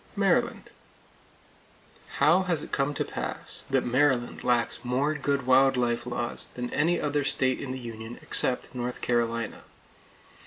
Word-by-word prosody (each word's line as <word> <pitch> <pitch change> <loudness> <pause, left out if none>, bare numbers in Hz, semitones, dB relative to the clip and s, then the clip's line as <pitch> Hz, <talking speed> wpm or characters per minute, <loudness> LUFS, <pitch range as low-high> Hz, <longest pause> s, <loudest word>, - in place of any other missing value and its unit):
Maryland: - - +1 1.5
How 155 +6 +5
has 175 -5 -1
it - - -10
come 140 +1 0
to - - -1
pass - - -5
that - - +1
Maryland 125 -1 +1
lacks 120 -2 +1
more 130 +5 0
good 140 -2 -1
wild 135 +1 +5
life 120 -1 0
laws 120 -1 -2
than 125 0 -4
any 170 +4 +2
other 145 -1 0
state 130 -1 +1
in 135 - -5
the 130 - -4
Union 115 -1 -8
except 125 - +2
North 125 0 -4
Carolina? 115 -2 -1
130 Hz, 145 wpm, -27 LUFS, 120-140 Hz, 1.5 s, How